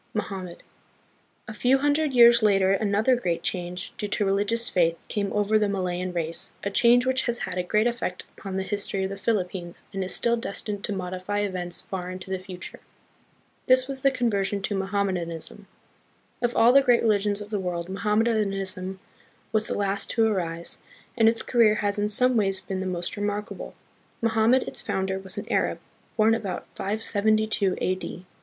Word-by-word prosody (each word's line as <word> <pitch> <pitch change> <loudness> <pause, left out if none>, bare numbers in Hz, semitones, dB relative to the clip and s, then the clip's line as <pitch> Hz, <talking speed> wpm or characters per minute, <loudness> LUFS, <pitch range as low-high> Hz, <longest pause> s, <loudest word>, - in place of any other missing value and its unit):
Mohammed. 190 -4 -5 0.8
A 215 - -6
few 250 +5 +3
hundred 290 +2 +1
years 235 -1 +7
later 195 -3 +4
another 210 +5 +2
great 175 -8 -2
change, 180 0 -3
due 210 - -2
to 205 0 0
religious 205 +4 +1
faith, 170 -2 +2
came 200 -2 -2
over 210 +1 +2
the 210 -1 +1
Malayan 185 -2 -2
race, 170 -1 -3
a 200 - -2
change 240 +4 +5
which 260 0 +1
has 240 0 0
had - - -5
a - - +3
great 210 +5 +1
effect 235 -6 -2
upon 190 -1 -6
the 190 - -1
history 200 -1 -1
of 190 - -2
the - - -4
Philippines, 190 -4 -2
and 195 -1 -2
is 185 - -2
still 235 +4 +2
destined 210 -3 -4
to - - -5
modify 185 +1 -3
events 180 -3 -1
far 180 -2 -5
into 185 +1 -7
the 190 - -1
future. 185 -1 -9 0.9
This 255 0 +5
was 270 -1 -2
the 275 - +5
conversion 205 -6 -1
to 205 - -1
Mohammedanism. 190 -1 -2 0.7
Of 240 -1 0
all 235 +2 +6
the 275 - +7
great 245 -3 +3
religions 205 -2 +2
of 210 0 -8
the 205 - 0
world, 175 -2 -3
Mohammedanism 195 -2 -1 0.5
was 215 -1 +2
the - - -2
last 200 0 -1
to 225 -2 +3
arise, 170 -6 -2 0.4
and 225 -2 +5
its 230 0 -1
career 230 -3 +4
has 205 0 -1
in 205 0 +1
some 250 +4 +4
ways 195 -3 +2
been 190 0 -5
the 190 - -3
most 175 -1 -3
re 205 - -4
markable. 205 +1 -4 0.4
Mohammed, 230 +3 +3
its - - -1
founder, 190 0 -2
was 190 +1 -5
an 205 - -4
Arab, - - +1 0.4
born 220 +1 +5
about 200 -5 -3
572 215 -1 +1
A.D. 185 0 -3
200 Hz, 180 wpm, -25 LUFS, 185-225 Hz, 0.9 s, years